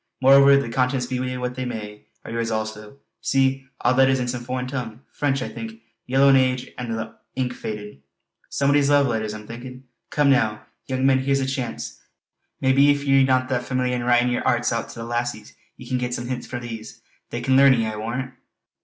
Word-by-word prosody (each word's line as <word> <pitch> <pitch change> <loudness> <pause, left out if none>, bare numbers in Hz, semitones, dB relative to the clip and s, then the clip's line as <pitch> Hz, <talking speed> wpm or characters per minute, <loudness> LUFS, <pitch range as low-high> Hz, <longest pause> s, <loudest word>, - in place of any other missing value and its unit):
Moreover 140 +1 +7
the 140 - -1
contents, 125 +1 0
be 125 0 -3
they 130 0 -3
what 125 0 -3
they 130 0 -4
may, 105 -4 -7 0.2
are - - -7
yours 115 0 -2
also. 110 +2 -4 0.2
See! 135 0 +1 0.2
aud 125 - +3
letters 135 0 +4
in 125 - -2
some 120 -1 -3
foreign 125 +1 -3
tongue 125 -3 -5
French 135 -2 0
I - - -4
think. 115 0 -8 0.3
Yellow 135 +2 +4
in 135 - +7
age 130 -1 +1
an' 125 -2 -4
the 115 0 -4 0.2
ink 125 -1 -1
faded. 105 - -7 0.5
Somebody's 140 0 +2
love 145 -1 +5
letters, 110 -4 -1
I'm 105 0 -9
thinkin'. 125 +3 -9 0.3
Come 145 -2 +3
now, 110 -5 +1 0.2
young 130 0 -1
men 135 -1 +4
here's 135 +1 +1
a 135 - 0
chance. 130 -3 -4 0.6
Maybe 135 +2 +5
if 145 0 +2
ye're 135 -1 +4
no 130 -1 +2
that 130 -2 0
fameeliar 125 0 -1
in 125 -1 -2
writin' 120 0 +3
yer 120 - 0
hairts 120 0 +1
oot 115 - -3
to - - -10
the 115 - -5
lassies, 120 -2 -3 0.2
ye 125 - -11
can 130 0 -1
get 125 0 -2
some 120 - -5
hints 125 -1 -4
frae 125 - -5
these. 115 -2 -8 0.3
They 120 - -4
can 130 +2 +2
learn 135 0 +7
ye, 115 -3 +1
I 110 0 -3
warrant!" 120 +4 -4
125 Hz, 215 wpm, -23 LUFS, 115-135 Hz, 0.6 s, Moreover